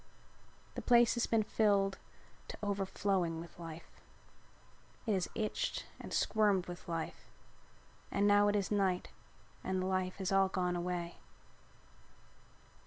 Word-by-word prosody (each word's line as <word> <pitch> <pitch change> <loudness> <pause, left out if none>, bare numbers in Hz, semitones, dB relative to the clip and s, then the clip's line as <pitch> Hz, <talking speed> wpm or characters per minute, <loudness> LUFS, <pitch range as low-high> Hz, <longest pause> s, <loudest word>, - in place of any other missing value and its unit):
The - - -4
place 240 -1 +5
has 235 - 0
been 225 -1 +3
filled 200 -2 +2 0.5
to - - -7
overflowing 195 -4 0
with 170 +1 -10
life. 165 -1 -9 1.0
It 220 - +1
has 185 -2 +1
itched 215 -1 -1
and - - -8
squirmed 205 -4 +2
with 175 -1 -8
life 165 -1 -4 0.8
and 200 - +1
now 205 0 +6
it 205 - +2
is 200 -1 0
night 190 -3 +1 0.5
and 190 0 -1
the 185 - -1
life 185 -1 0
has 190 -1 -2
all 195 0 +4
gone 180 -1 0
away. 175 -1 -3
190 Hz, 130 wpm, -34 LUFS, 180-205 Hz, 1.0 s, now